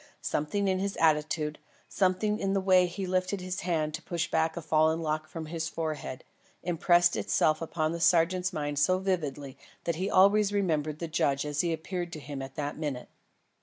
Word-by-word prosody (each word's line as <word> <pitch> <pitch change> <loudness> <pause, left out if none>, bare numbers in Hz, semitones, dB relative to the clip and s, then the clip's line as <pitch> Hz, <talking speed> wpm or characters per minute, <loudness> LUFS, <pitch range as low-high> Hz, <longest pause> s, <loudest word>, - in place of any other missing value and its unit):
Something 195 +7 -1
in 190 -1 +1
his 200 +1 -2
attitude, 155 -1 +1 0.3
something 200 +3 +1
in 195 0 0
the 195 - +2
way 185 -1 +4
he 190 +2 -5
lifted 185 +2 0
his 185 0 -4
hand 160 -4 -1
to 155 - -4
push 170 -2 -3
back 160 +1 +1
a - - -3
fallen 160 +1 +3
lock 155 -1 -2
from 165 -1 -6
his 160 0 -3
forehead, 155 -6 -4 0.4
impressed 175 0 +3
itself 155 0 +1
upon 155 -1 -1
the 170 - -4
sergeant's 180 +2 +3
mind 145 -3 -2
so 185 +5 +3
vividly 145 -8 -3 0.2
that 170 -2 -1
he 190 +3 -1
always 200 +2 +5
remembered 155 -7 0
the 170 - -4
judge 140 -3 0
as 150 0 0
he 170 - 0
appeared 175 +2 -4
to 155 - -5
him 140 -2 -6
at 135 0 -8
that 145 0 -4
minute. 145 -5 -4
165 Hz, 190 wpm, -29 LUFS, 155-185 Hz, 0.4 s, always